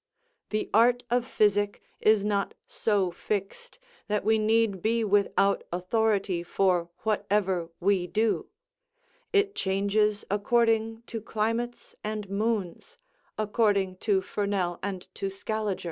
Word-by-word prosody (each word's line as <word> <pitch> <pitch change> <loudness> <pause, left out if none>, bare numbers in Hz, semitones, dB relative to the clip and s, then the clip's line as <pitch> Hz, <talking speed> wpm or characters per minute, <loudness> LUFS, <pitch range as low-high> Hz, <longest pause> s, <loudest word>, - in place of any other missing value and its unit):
The 215 0 -1
art 240 +3 +4
of 245 0 +1
physic 205 -2 +2 0.2
is 215 -2 +4
not 200 -1 0
so 200 -5 0
fixed, 205 - -4 0.3
that 210 -1 -1
we 220 0 +4
need 215 -3 +2
be 230 +3 +1
without 200 -1 +2
authority 195 0 0
for 175 -1 +1
whatever 200 -5 0
we 185 -1 +2
do; 220 +3 0 0.8
it 405 -1 +2
changes 205 - +1
according 225 +1 +1
to 230 -1 -6
climates 230 +3 -3
and 215 -1 -3
moons, 215 - -2 0.4
according 205 -3 +1
to 195 -1 +1
Fernel 195 -4 -1
and 190 -2 -4
to 195 - -3
Scaliger. 210 0 -3
210 Hz, 115 wpm, -27 LUFS, 195-225 Hz, 0.8 s, art